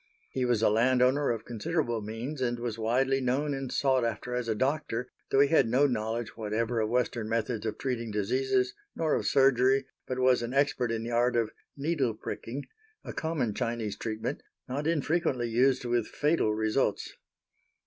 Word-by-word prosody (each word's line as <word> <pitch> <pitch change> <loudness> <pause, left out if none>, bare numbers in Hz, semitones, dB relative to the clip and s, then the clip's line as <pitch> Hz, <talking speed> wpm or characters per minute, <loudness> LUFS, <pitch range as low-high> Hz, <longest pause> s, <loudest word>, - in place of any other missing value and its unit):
He 130 -1 0
was 120 -3 +1
a - - +6
landowner 130 +5 +3
of 115 -2 -2
considerable 120 +1 -1
means, 115 +7 -5
and 120 -1 0
was 120 -2 -4
widely 130 +4 +2
known 135 +4 0
and 135 -2 -4
sought 130 -3 +2
after 115 +2 -3
as 125 -1 -2
a 110 - 0
doctor 130 -1 -1 0.2
though 135 - +4
he 140 - +4
had 150 -7 +4
no 130 +5 +4
knowledge 115 -2 -2
whatever 115 +2 -1
of 110 -1 0
Western 120 -2 0
methods 115 -1 -1
of 105 - -3
treating 120 -3 -2
diseases, 125 +5 +1 0.2
nor 160 -2 +1
of - - 0
surgery, 135 0 +4 0.2
but 130 - -3
was 130 -1 +4
an 120 +3 -4
expert 135 -4 +2
in 115 -1 -2
the 120 - -4
art 120 +1 +2
of 115 -2 +1 0.3
"needle 140 -6 0
pricking," 125 +5 -6 0.4
a - - -7
common 155 -9 -1
Chinese 115 -3 -2
treatment 110 0 -4 0.3
not 145 +4 -2
infrequently 150 -5 +1
used 125 +2 +3
with 120 -2 +1
fatal 150 -7 +1
results. 110 +1 0
125 Hz, 175 wpm, -29 LUFS, 115-135 Hz, 0.4 s, a